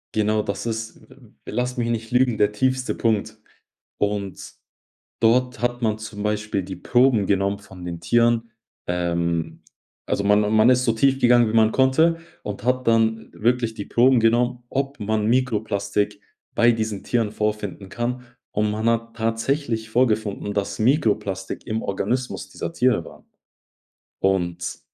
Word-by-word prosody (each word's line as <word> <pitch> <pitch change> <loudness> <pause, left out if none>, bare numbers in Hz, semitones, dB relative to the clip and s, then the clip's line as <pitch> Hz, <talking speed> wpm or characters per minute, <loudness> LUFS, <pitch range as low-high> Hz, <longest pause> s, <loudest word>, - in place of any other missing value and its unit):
Genau, 105 0 +2
das 100 +3 -4
ist 110 -1 -4
v - - -16 0.3
v - - -8
lass 125 +3 -1
mich 120 -1 -1
nicht 115 0 -3
lügen, 125 -2 +3
der 105 0 +2
tiefste 130 +3 0
Punkt. 110 -1 0 0.6
Und 100 -2 -2 0.8
dort 125 +1 +2
hat 120 0 0
man 110 -3 +1
zum 110 -1 -7
Beispiel 105 -1 -1
die 95 0 -7
Proben 120 0 +3
genommen 100 0 0
von 95 -3 -13
den 85 -1 -5
Tieren. 115 +5 +2 0.4
Ähm, 85 -2 -1 0.4
also 100 - -1
man 105 +1 +3
man 110 +2 +5
ist 125 0 +4
so 115 - +3
tief 135 +4 +2
gegangen, 120 -2 +5
wie 115 - 0
man 110 0 +4
konnte, 160 +6 +3 0.2
und 100 -1 -6
hat 125 +1 0
dann 115 -1 +2
wirklich 120 0 0
die 105 -3 -7
Proben 125 0 +4
genommen, 120 +2 +2
ob 135 +2 -3
man 105 0 0
Mikroplastik 105 -4 0 0.3
bei 120 0 +5
diesen 110 -3 -3
Tieren 115 -4 0
vorfinden 105 -3 -3
kann. 120 +3 -3 0.3
Und 105 0 0
man 110 +2 -2
hat 115 0 -2
tatsächlich 115 +1 -1
vorgefunden, 110 -4 0
dass 100 -1 -2
Mikroplastik 105 - 0
im 110 0 -2
Organismus 125 +6 -2
dieser 85 - -6
Tiere 125 -7 +2
war. - - -14 1.0
Und 85 -3 -1
110 Hz, 150 wpm, -23 LUFS, 105-120 Hz, 1.0 s, man